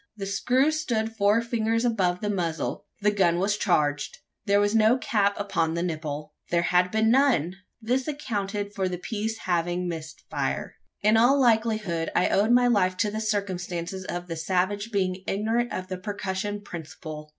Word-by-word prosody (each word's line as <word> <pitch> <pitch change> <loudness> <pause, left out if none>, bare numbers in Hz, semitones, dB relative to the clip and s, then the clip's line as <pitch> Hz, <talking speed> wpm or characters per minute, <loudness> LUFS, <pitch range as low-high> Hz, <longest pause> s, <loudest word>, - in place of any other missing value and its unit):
The 195 - -4
screw 255 +9 +2
stood 225 -8 -1
four 210 +2 +3
fingers 230 0 0
above 185 -6 +1
the 210 - -1
muzzle: 170 -5 -2
the 210 +1 +3
gun 180 -4 +2
was 200 +3 +1
charged! 145 -7 0 0.3
There 200 0 +4
was 205 +1 +2
no 225 +2 +5
cap 205 -5 +1
upon 170 -5 0
the 170 - -1
nipple. 155 -3 -4 0.2
There 170 0 +2
had 180 +1 +3
been 220 +2 +2
none! 235 - +3 0.2
This 250 +3 -1
accounted 205 -8 -3
for 190 -3 -1
the 180 - -3
piece 220 +4 -3
having 175 -1 -1
missed 160 -2 -6
fire. - - -3 0.3
In 215 +2 +5
all 250 +5 +5
likelihood, 220 - +1
I - - +3
owed 205 +3 +2
my 245 +1 +5
life 190 -6 +2
to 210 +1 +1
the 215 +1 -3
circumstance 185 -5 -2
of 175 -2 -5
the 170 -2 -5
savage 190 +6 -1
being 185 -2 0
ignorant 225 +4 0
of 185 0 -4
the 185 -1 -5
percussion 200 +1 -3
principle! 155 -4 -8
200 Hz, 175 wpm, -26 LUFS, 180-220 Hz, 0.3 s, no